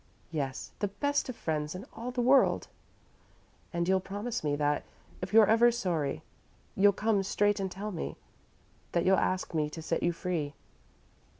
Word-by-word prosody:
"Yes 140 -5 -3
the 205 - +1
best 285 +8 -1
of 255 - -4
friends 150 -2 -2
in 190 +5 -7
all 235 +2 -5
the 250 -1 -1
world." 265 +2 +4 1.0
"And 170 -1 -1
you'll 190 0 +4
promise 205 +5 -4
me 145 -1 +1
that, 145 0 +1 0.4
if 185 +1 -4
you're 220 0 +8
ever 230 +3 +5
sorry, 170 - -1 0.5
you'll 200 +1 +6
come 210 0 +1
straight 205 +1 +1
and 190 -1 -2
tell 205 +3 -5
me 170 - -5 0.8
that 170 0 +1
you'll 190 +1 +5
ask 185 -1 0
me 155 -2 +1
to 155 - -8
set 165 - -1
you 175 - +2
free?" 165 -5 -3
190 Hz, 170 wpm, -30 LUFS, 160-215 Hz, 1.0 s, you're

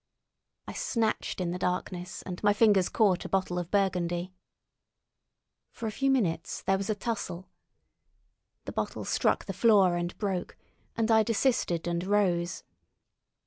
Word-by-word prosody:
I - - -6
snatched 230 - -1
in 175 -2 -1
the 180 - -4
darkness, 180 0 -3
and 180 -1 -6
my 205 -1 +4
fingers 205 -4 +4
caught 200 -5 +2
a - - -6
bottle 185 -2 0
of 175 -1 -5
burgundy. 180 -2 0 1.4
For 235 - -8
a 220 - -1
few 270 +5 0
minutes 185 -11 0
there 195 0 +2
was 195 - -4
a 215 - +1
tussle. 200 -5 -4 1.1
The - - -5
bottle - - -3
struck - - +1
the - - -4
floor 200 -6 +4
and 175 0 -3
broke, 190 -4 -3 0.4
and 225 0 +1
I 220 0 +6
desisted 220 -7 +1
and 170 0 -1
rose. 185 -3 +1
190 Hz, 145 wpm, -29 LUFS, 175-215 Hz, 1.4 s, I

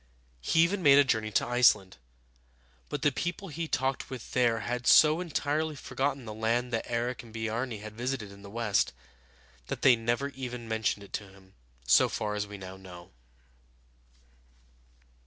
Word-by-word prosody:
He 160 - +3
even 190 +3 0
made 140 -4 +7
a 145 - +7
journey 110 -5 0
to - - +2
Iceland; 115 - +3 0.9
but 145 - -4
the 145 - +4
people 175 +6 -4
he 165 +2 -4
talked 135 -2 -1
with 130 -4 -8
there 120 -3 +2
had 125 +3 -3
so 155 +2 +6
entirely 155 -2 -1
forgotten 135 -1 -3
the 110 - -6
land 115 +3 -1
that 115 - -2
Eric 120 +1 -2
and 115 -2 -15
Biarni 115 0 -3
had 110 0 -8
visited 120 -3 -3
in 100 0 -14
the 100 - -11
west, 105 - 0 0.7
that - - -5
they 130 -2 +7
never 120 +4 -1
even 125 -3 -7
mentioned 110 -2 -1
it 100 - -15
to 100 -2 -4
him, 95 0 -19 0.3
so 60 - +5
far 105 -1 -3
as 105 0 -2
we 100 0 -8
now 95 0 -9
know. 90 -2 -12
120 Hz, 170 wpm, -29 LUFS, 105-135 Hz, 0.9 s, made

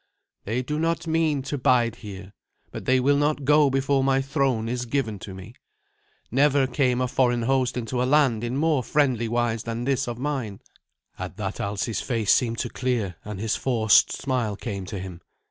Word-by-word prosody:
"They 115 +5 -1
do 150 +4 -3
not 165 +1 0
mean 160 -4 +1
to 145 +1 -4
bide 120 -2 +2
here, 100 -2 -10 0.4
but - - -7
they 130 0 +3
will 140 +3 +3
not 145 -1 0
go 150 0 +5
before 135 0 +1
my 135 0 +3
throne 135 -5 0
is 120 +1 -3
given 115 -5 -1
to 95 0 -8
me. 95 -1 -10 0.8
Never 140 +2 +3
came 130 -2 +1
a 125 - +1
foreign 120 -2 +1
host 130 0 +1
into 125 +1 -2
a - - +2
land 130 -5 +3
in 120 +2 -2
more 155 -2 +2
friendly 125 -3 +1
wise 120 -1 0
than 115 0 -4
this 135 0 0
of 120 -1 -4
mine." 125 -7 -3 0.6
At - - -6
that 100 -2 -4
Alsi's 105 +3 -2
face 115 -5 +1
seemed 115 -2 +1
to 120 - -3
clear, 115 -10 -2
and 105 -2 -7
his 110 +1 0
forced 115 -5 +3
smile 125 -6 -2
came 100 -4 -5
to 100 - -5
him. 90 -2 -7
125 Hz, 190 wpm, -25 LUFS, 110-135 Hz, 0.8 s, go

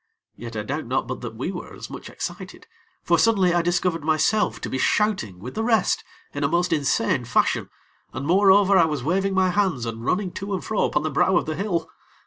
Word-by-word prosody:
Yet, 115 -1 -9
I 105 - -2
doubt 140 +5 -4
not 130 +1 0
but 130 +1 -6
that 115 -2 -6
we 130 +11 -3
were 180 - -8
as - - -8
much - - -8
excited; - - -7 0.4
for - - +2
suddenly 195 -6 +3
I 175 - +3
discovered 175 -1 0
myself 160 +7 +1
to - - -4
be 130 - -3
shouting 190 - +1
with 115 +8 -8
the 220 - -2
rest 225 -4 +2 0.3
in 145 - -3
a - - +3
most 170 +2 +1
insane 135 -4 +1
fashion, 120 0 +1 0.4
and 140 - -5
more 190 +5 +4
over 195 0 +6
I 170 - +6
was 150 -5 -3
waving 190 +5 0
my 185 -1 +3
hands 180 - 0
and 115 0 -5
running 180 +7 0
to 195 +2 -4
and 185 - -6
fro 220 - +1
upon 150 - 0
the 155 - -2
brow 175 +6 +3
of - - 0
the 155 - -3
hill. 175 -3 -2
170 Hz, 225 wpm, -23 LUFS, 135-195 Hz, 0.4 s, over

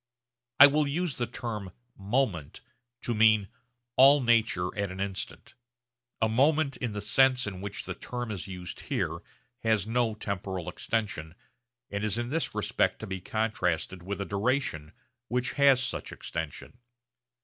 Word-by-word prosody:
I 140 - +13
will 145 +1 +3
use 160 +1 -1
the 120 - 0
term 105 -5 -5 0.2
'moment' 100 - -1 0.4
to 120 - 0
mean 110 -2 +4 0.5
'all 140 +3 +8
nature 115 -7 +2
at 100 -2 -1
an 95 - -8
instant.' 100 -1 -5 0.7
A - - +5
moment, 140 +5 +2
in 120 -4 -3
the 105 - -4
sense 130 +3 +4
in 95 -3 -5
which 100 0 -5
the 90 - -4
term 120 +4 -5
is 100 -4 -4
here 95 - -8
used, 90 - -7 0.8
has 110 -5 +1
no 115 -1 0
temporal 95 -4 -4
extension, 105 -5 -3 0.6
and 100 +1 -2
is 105 0 0
in 120 0 -2
this 160 +4 -1
respect - - +1
to - - -4
be 95 -2 -5
contrasted 95 -5 -1
with 100 +3 -5
a 100 - -2
duration 100 - -1 0.4
which 125 +2 0
has 140 -2 +5
such - - -4
extension. 80 - -6
110 Hz, 150 wpm, -29 LUFS, 95-125 Hz, 0.8 s, I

